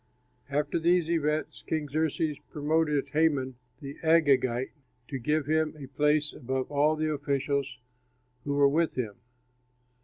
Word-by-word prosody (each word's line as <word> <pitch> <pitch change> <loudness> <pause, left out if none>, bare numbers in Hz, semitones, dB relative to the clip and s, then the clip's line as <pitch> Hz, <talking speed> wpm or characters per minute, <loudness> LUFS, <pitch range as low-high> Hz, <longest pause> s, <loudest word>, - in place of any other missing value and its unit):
After 145 +3 0
these 170 0 +2
events 155 -2 -1
King 155 -2 -1
Xerxes 155 0 -1
promoted 150 -1 0
Haman, 140 -5 +1 0.2
the 140 -1 -6
Agagite, 135 -6 +3 0.4
and 135 -4 -4
gave 150 +2 +1
him 155 +1 +1
a 140 - -8
place 150 +1 +2
above 130 0 -3
all 145 +2 +3
the 155 0 -1
officials 140 -2 -1 0.7
who 140 0 -2
were 140 0 +5
with 160 +4 +1
him. 115 -5 -2
150 Hz, 130 wpm, -28 LUFS, 140-155 Hz, 0.7 s, were